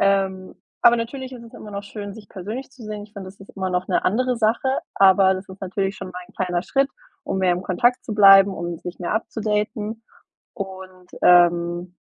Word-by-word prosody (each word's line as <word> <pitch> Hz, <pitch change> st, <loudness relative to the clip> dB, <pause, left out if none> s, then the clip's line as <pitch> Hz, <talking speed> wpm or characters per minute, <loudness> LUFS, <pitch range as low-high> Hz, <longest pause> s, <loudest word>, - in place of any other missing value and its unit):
Ähm, 195 Hz, -1 st, +1 dB, 0.3 s
aber 240 Hz, 0 st, +7 dB
natürlich 260 Hz, +3 st, -5 dB
ist 235 Hz, -2 st, -10 dB
es 230 Hz, -, -15 dB
immer 210 Hz, -, -10 dB
noch 200 Hz, 0 st, -5 dB
schön, 205 Hz, -1 st, -8 dB
sich 210 Hz, -3 st, -13 dB
persönlich 215 Hz, +9 st, -7 dB
zu 260 Hz, -3 st, -15 dB
sehen. 210 Hz, -1 st, -6 dB
Ich 210 Hz, -, -19 dB
finde, 190 Hz, -2 st, -8 dB
das 195 Hz, +1 st, -15 dB
ist 195 Hz, -, -13 dB
immer 190 Hz, -1 st, -2 dB
noch 180 Hz, 0 st, -1 dB
'ne 180 Hz, -, +1 dB
andere 250 Hz, +5 st, +1 dB
Sache, 230 Hz, +3 st, +1 dB, 0.3 s
aber 190 Hz, 0 st, +5 dB
das 190 Hz, +1 st, -7 dB
ist 190 Hz, 0 st, -12 dB
natürlich 195 Hz, +1 st, -2 dB
schon 190 Hz, -, -7 dB
mal 180 Hz, -, -7 dB
'n -, -, -21 dB
kleiner 180 Hz, -2 st, -1 dB
Schritt, 275 Hz, 0 st, +1 dB, 0.4 s
um -, -, -2 dB
mehr 185 Hz, -1 st, +3 dB
im 180 Hz, +1 st, -3 dB
Kontakt 240 Hz, +8 st, +1 dB
zu 215 Hz, -, -4 dB
bleiben, 195 Hz, -1 st, +7 dB
um 170 Hz, -1 st, -5 dB
sich 175 Hz, +1 st, -8 dB
mehr 175 Hz, -, -3 dB
upzudaten 215 Hz, 0 st, -2 dB, 0.5 s
und, 190 Hz, -3 st, -9 dB
ähm, 175 Hz, 0 st, +4 dB
195 Hz, 210 wpm, -22 LUFS, 185-220 Hz, 0.5 s, aber